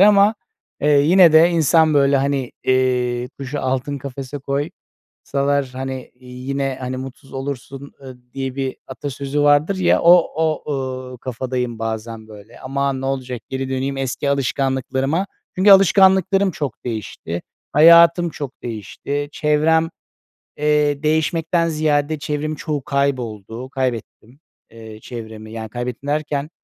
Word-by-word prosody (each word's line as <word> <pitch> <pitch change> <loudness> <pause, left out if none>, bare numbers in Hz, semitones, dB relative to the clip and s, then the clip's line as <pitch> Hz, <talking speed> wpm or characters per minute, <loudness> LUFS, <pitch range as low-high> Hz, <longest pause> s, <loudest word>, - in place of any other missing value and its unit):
ama, 205 +1 +6 0.5
eee, 145 - +1
yine 170 +3 +6
de 160 +2 +7
insan 160 -1 +3
böyle, 140 -1 +4
hani, 135 -2 -1
eee, 125 -1 +1
kuşu 140 +1 -4
altın 130 +2 -2
kafese 135 +1 -7 0.6
koysalar, 140 -1 -2
hani, 130 0 -6
yine, 130 +2 -4
hani, 130 0 -4
mutsuz 135 +1 -9
olursun, 135 +1 -6
ııı, 130 -2 -10 0.2
diye 135 -1 -4
bir 135 -1 -3
atasözü 140 +1 -3
vardır 145 +6 +3
ya, 185 -1 +3
o 170 +1 +8 0.2
o, 155 -2 -1
ııı, 130 -1 -5
kafadayım 125 -1 -4
bazen 110 0 -5
böyle. 105 -2 -14
Aman, 135 0 -2
ne - - -3
olacak, 130 -3 -3
geri 130 0 -3
döneyim 135 +1 -2
eski 135 +1 -2
alışkanlıklarıma. 135 +4 0 0.3
Çünkü 190 +2 +5
alışkanlıklarım 190 0 +5
çok 145 -6 -5
değişti. 105 -7 -5 0.3
Hayatım 170 +3 +7
çok 140 -4 -8
değişti. 125 +6 -4
Çevrem, 160 +2 +2 0.7
eee, 150 -1 +1
değişmekten 165 +2 +1
ziyade, 155 -1 0
çevremin 155 0 -3
çoğu 150 -2 -3
kayboldu, 125 -4 -2
kaybettim, 125 -1 -4 0.3
eee, 110 -1 -11
çevremi. 110 -2 -9
Yani 110 -1 -6
kaybettim 120 +4 -5
derken, 150 -1 -1
140 Hz, 125 wpm, -20 LUFS, 130-150 Hz, 0.7 s, o